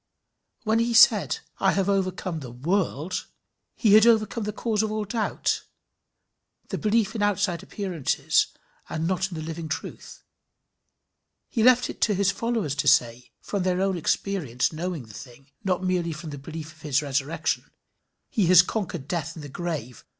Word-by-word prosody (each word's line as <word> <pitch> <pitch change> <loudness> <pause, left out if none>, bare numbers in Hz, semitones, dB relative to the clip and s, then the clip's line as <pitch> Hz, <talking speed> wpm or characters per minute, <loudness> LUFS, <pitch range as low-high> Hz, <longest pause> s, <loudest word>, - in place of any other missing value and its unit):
When 220 0 +2
he 235 0 +1
said 225 -2 +6 0.2
"I 190 - +3
have 195 -1 0
overcome 185 -3 -1
the 130 -4 -8
world" 165 +5 -2 0.5
he 215 -4 +3
had 215 +2 +8
overcome 220 -1 +2
the 210 - -2
cause 215 0 -1
of 215 -1 -1
all 215 -1 -2
doubt, 215 +2 -1 1.1
the - - -3
belief 215 -1 +1
in 225 - -4
the 205 - +3
outside 200 -4 0
appearances 190 -6 0 0.4
and 160 +1 -2
not 185 +1 0
in 175 - -7
the 155 - -5
living 160 0 -5
truth: 160 - -6 1.3
he 230 - -1
left 250 +1 +5
it - - -8
to 210 - +3
his 200 +1 +2
followers 225 - -1
to - - 0
say, 120 0 +3
from 200 - -3
their 180 0 +1
own 195 0 +1
experience 160 -7 -1
knowing 165 -4 -4
the 110 - -14
thing, 130 +4 -12
not 185 -2 0
merely 180 -3 0
from 155 0 -7
the 145 - -7
belief 160 +2 -8
of 160 -1 -20
his 145 -1 +1
resurrection, 140 +2 -1 0.6
"He 205 -6 +1
has 180 0 +8
conquered 180 -8 -4
death 160 -1 -3
and 160 - -9
the 145 - -8
grave. 140 -7 -5
180 Hz, 170 wpm, -25 LUFS, 155-205 Hz, 1.3 s, had